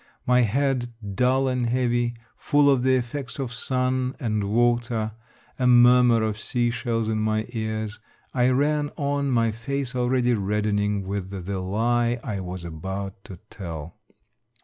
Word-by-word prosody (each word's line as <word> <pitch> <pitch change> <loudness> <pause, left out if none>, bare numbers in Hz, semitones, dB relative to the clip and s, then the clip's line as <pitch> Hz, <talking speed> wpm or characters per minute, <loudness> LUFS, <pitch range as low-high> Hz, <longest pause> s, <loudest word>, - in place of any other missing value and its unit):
My 125 0 +4
head 125 +1 0 0.2
dull 130 +5 +2
and 125 -2 0
heavy, 120 -1 +1 0.2
full 145 -1 +3
of 135 -3 +2
the 130 +1 +3
effects 125 +1 -3
of 130 -3 -4
sun 130 0 -1
and 110 -4 -1
water, 120 0 +1 0.5
a 125 - +2
murmur 120 -1 +6
of 110 -1 -2
sea 120 +2 0
shells 115 -1 -1
in 110 -1 0
my 110 0 0
ears, 110 -2 -4 0.3
I 125 -1 +3
ran 145 +3 +1
on, 140 -1 0
my 115 -3 +2
face 125 +3 -4
already 125 0 +2
reddening 105 -1 0
with 95 -1 -4
the 95 0 -4
lie 120 +5 +1
I 105 -6 -3
was 90 -1 -6
about 95 +4 -6
to 95 -6 -9
tell. 85 -5 -7
120 Hz, 150 wpm, -25 LUFS, 105-125 Hz, 0.5 s, murmur